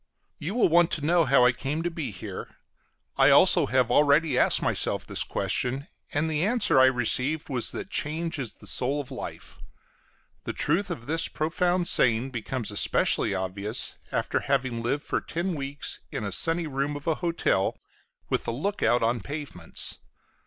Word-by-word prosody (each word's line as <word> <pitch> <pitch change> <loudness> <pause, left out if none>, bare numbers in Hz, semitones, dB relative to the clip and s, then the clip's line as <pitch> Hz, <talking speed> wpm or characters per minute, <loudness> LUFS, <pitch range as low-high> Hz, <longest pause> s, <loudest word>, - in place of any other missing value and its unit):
You 175 +8 -4
will 245 - +4
want 170 0 +4
to 150 - -2
know 170 0 +3
how 130 -1 +4
I 125 - +6
come 145 +6 -3
to 175 - -2
be 160 -3 -4
here. 95 -4 -8 0.6
I - - +6
also - - +5
have 125 -2 +1
already 145 +1 +4
asked - - +3
myself - - 0
this - - 0
question, 135 +4 -2 0.2
and 150 +2 0
the 155 0 0
answer 220 - +3
I 130 - +7
received 130 +5 +1
was 125 -4 +2
that - - -6
change 160 +1 -2
is 125 -5 -3
the - - -16
soul 135 +4 0
of 140 - -7
life. - - -8 0.8
The - - -4
truth 185 +6 0
of 130 -10 -6
this 165 +3 0
profound 175 +3 0
saying 120 +2 +3
becomes 120 -1 -4
especially 100 -1 +2
obvious 100 +4 -3
after - - -1
having 130 -4 -1
lived 135 +5 -1
for - - -2
ten 175 +3 -3
weeks 140 -1 -3
in - - -4
a 100 - -3
sunny 165 - +2
room 140 0 -2
of 145 - -8
a 165 - +2
hotel, 165 - 0 0.5
with - - -1
the - - -1
look 195 - -3
out 120 -1 +2
on 115 +1 0
pavements. 140 - -4
140 Hz, 175 wpm, -26 LUFS, 125-165 Hz, 0.8 s, I